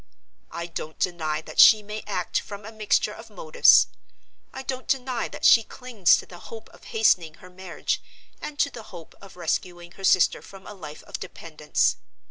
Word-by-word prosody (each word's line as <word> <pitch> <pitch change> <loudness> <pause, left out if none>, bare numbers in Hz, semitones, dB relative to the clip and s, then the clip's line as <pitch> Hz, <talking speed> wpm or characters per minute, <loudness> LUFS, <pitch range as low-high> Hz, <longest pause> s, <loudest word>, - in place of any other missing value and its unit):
I 170 - -5
don't 160 -2 -7
deny 160 -4 -2
that - - -8
she 215 -2 +8
may 210 +1 -6
act 185 -4 -1
from 200 0 -10
a 220 - -8
mixture 215 -2 0
of - - -12
motives. 485 0 +5 0.7
I 265 - -8
don't 260 0 -5
deny 255 -2 -1
that - - -6
she 230 - +8
clings 225 -5 +1
to - - -7
the 175 - -13
hope 225 +3 -11
of - - -19
hastening 175 -8 +2
her 180 +1 -16
marriage, 185 0 -4 0.4
and 300 - -7
to 285 - +1
the 235 - -9
hope 175 -5 -12
of 195 -2 -14
rescuing 175 0 -3
her 195 - -14
sister 185 -2 +3
from 195 -1 -14
a - - -9
life 155 -6 -10
of - - -7
dependence. - - -2
195 Hz, 185 wpm, -25 LUFS, 175-230 Hz, 0.7 s, she